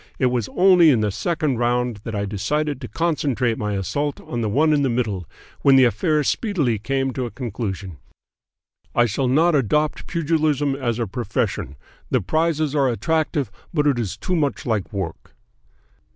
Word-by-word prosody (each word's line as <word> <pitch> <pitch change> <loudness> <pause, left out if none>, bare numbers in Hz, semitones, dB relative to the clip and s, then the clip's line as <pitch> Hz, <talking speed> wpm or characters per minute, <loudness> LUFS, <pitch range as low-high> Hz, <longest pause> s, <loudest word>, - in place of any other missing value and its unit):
It 130 -2 +2
was 120 -4 -1
only 180 -3 +6
in 125 -7 +3
the 105 -1 0
second 140 - -1
round 120 -1 0
that 115 - -4
I 100 0 -1
decided 135 +8 -2
to 125 - -5
concentrate 135 -8 0
my 105 -1 -2
assault 140 +10 -2
on 120 - -5
the 110 - 0
one 155 +8 +3
in 145 - +2
the 135 - +1
middle, 105 -8 -2 0.3
when 135 -1 +6
the 130 - +7
affair 150 - +2
speedily 145 - 0
came 135 +3 -1
to 125 -1 -2
a - - -6
conclusion. 100 - -5 1.0
I 120 - +5
shall 125 +4 -1
not 160 +7 +3
adopt 150 +3 +1
pugilism 155 -4 +1
as 120 -4 -2
a 120 - -1
profession. 95 - -3 0.3
The - - +2
prizes 155 - 0
are 140 -3 +2
attractive, 150 - -1 0.2
but 150 -2 +2
it 140 -4 +2
is 105 -6 -3
too 185 - -2
much 145 -4 -1
like 110 -5 -1
work.'" 95 -6 -6
130 Hz, 175 wpm, -22 LUFS, 110-150 Hz, 1.0 s, the